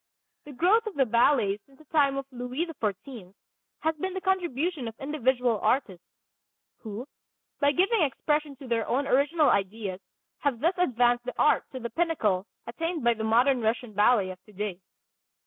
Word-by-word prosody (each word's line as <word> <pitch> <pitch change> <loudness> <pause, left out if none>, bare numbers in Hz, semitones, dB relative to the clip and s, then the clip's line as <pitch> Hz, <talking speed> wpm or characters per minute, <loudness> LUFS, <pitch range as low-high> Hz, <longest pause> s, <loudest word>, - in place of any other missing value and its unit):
The 295 - -9
growth 390 - +3
of 430 - -5
the 270 - +3
ballet 235 -3 +3
since 270 +3 -24
the 310 - -19
time 280 -2 +2
of 275 - -3
Louis 250 +6 -3
XIV 215 - -5 0.5
has 320 0 0
been 375 +4 -3
the 380 - -3
contribution 345 -6 -1
of 225 0 -9
individual 255 -5 0
artists, 195 -10 0 0.8
who 220 +2 -7 0.5
by 285 -1 +4
giving 390 +7 +2
expression 295 +1 0
to 265 0 -11
their 230 -2 0
own 270 +4 0
original 290 +4 +3
ideas 195 -1 -2 0.4
have 275 -5 -1
thus 335 +8 +2
advanced 245 -6 +2
the 250 - -5
art 300 - +3
to 260 - -5
the 235 -1 -5
pinnacle 225 - 0 0.2
attained 330 +5 -3
by 235 0 +4
the 220 -1 -5
modern 245 +4 +3
Russian 225 0 -1
ballet 205 -2 +3
of 185 0 -12
today. 205 -3 -5
255 Hz, 165 wpm, -27 LUFS, 225-300 Hz, 0.8 s, by